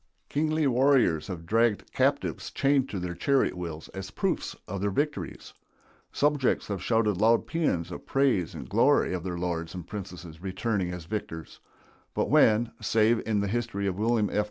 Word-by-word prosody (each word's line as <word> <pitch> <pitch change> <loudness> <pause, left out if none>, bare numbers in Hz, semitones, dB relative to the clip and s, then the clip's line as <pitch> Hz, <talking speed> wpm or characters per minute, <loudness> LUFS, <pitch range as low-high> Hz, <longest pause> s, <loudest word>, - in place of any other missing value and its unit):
Kingly 155 +1 +1
warriors 130 - +3
have 85 -4 -6
dragged 115 +2 +1
captives - - 0
chained 135 -1 +2
to 100 - -4
their 90 -1 -3
chariot 135 +7 +1
wheels 85 -3 -6
as 95 0 -7
proofs 180 - -2
of 100 0 -4
their 100 - +1
victories; 145 +9 -3 0.6
subjects 145 -3 +1
have 100 -3 -3
shouted 110 -4 +1
loud 115 +1 +4
pæans 150 - -1
of - - -8
praise 130 - +1
and - - -7
glory - - +3
of 90 -2 -3
their 90 -2 -3
lords 85 -1 -3
and 90 -3 -6
princes 90 -5 -8
returning 95 0 -1
as 90 -2 -7
victors; 85 -5 -6 0.6
but - - 0
when, 115 +2 +4
save 110 +1 +3
in 105 -2 +1
the 100 - -1
history 115 -2 -2
of 95 -2 0
William 110 -1 +2
F. - - +1
105 Hz, 170 wpm, -28 LUFS, 90-120 Hz, 0.6 s, loud